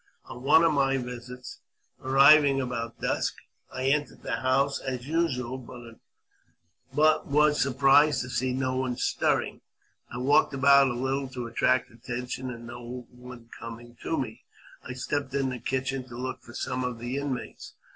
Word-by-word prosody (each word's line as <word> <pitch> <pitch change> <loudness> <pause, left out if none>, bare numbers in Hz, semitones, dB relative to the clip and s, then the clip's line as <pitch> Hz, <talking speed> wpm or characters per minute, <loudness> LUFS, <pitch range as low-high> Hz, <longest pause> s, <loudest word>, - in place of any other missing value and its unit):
On 125 - -10
one 160 +5 +5
of 165 -2 +4
my 135 -1 +2
visits, 125 0 -8 0.4
arriving 135 +1 +6
about 120 -3 -4
dusk, - - -1 0.4
I 130 - -5
entered 145 +2 0
the - - -2
house 135 +2 +1
as 130 -1 -5
usual, 130 -6 -1 1.3
but 155 +3 +3
was 150 +1 +3
surprised 135 +1 +4
to 125 - -8
see 125 +1 0
no 130 0 -1
one 130 -2 -2
stirring. - - 0 0.5
I 120 - -6
walked 135 +2 +3
about 140 0 +6
a 125 - -2
little 135 +2 -1
to 125 -2 -6
attract 120 +2 +1
attention, 125 +2 -5
and 120 -1 -8
no 120 +1 -8
one 125 -1 -13
coming 120 +1 -9
to 160 - -2
me, 125 -6 -4 0.4
I 130 - -6
stepped 135 +1 -3
into 135 -1 0
the 125 - -5
kitchen 130 +1 -2
to 120 -1 -9
look 130 +1 -5
for 120 - -14
some 130 0 -2
of 125 -2 -3
the 120 +3 -4
inmates. 140 -3 -5
130 Hz, 160 wpm, -27 LUFS, 125-140 Hz, 1.3 s, arriving